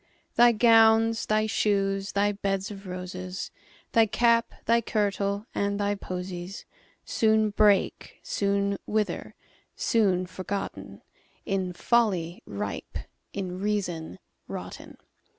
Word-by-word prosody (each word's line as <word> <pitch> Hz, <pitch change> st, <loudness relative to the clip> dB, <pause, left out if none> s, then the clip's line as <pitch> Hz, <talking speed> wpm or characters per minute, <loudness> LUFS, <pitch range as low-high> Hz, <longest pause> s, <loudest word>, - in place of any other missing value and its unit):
Thy 240 Hz, 0 st, +7 dB
gowns, 225 Hz, 0 st, +5 dB
thy 215 Hz, 0 st, +2 dB
shoes, 195 Hz, -2 st, 0 dB
thy 205 Hz, +1 st, +2 dB
beds 195 Hz, -1 st, -2 dB
of 200 Hz, -1 st, -9 dB
roses, 185 Hz, 0 st, -6 dB, 0.4 s
Thy 225 Hz, -2 st, +5 dB
cap, 230 Hz, +1 st, +3 dB
thy 235 Hz, +1 st, +4 dB
kirtle, 200 Hz, -1 st, -1 dB
and 200 Hz, 0 st, -1 dB
thy 205 Hz, 0 st, +1 dB
posies, 180 Hz, -1 st, -6 dB, 0.4 s
Soon 220 Hz, -1 st, +2 dB
break, 205 Hz, -1 st, +2 dB
soon 200 Hz, 0 st, 0 dB
wither—soon 210 Hz, -2 st, -1 dB
forgotten, 190 Hz, +2 st, -6 dB, 0.4 s
In 190 Hz, -2 st, -1 dB
folly 185 Hz, -5 st, +1 dB
ripe, 100 Hz, 0 st, -5 dB, 0.3 s
in 185 Hz, -2 st, -4 dB
reason 180 Hz, -, -2 dB, 0.3 s
rotten. -, -, -8 dB
200 Hz, 100 wpm, -27 LUFS, 185-215 Hz, 0.4 s, Thy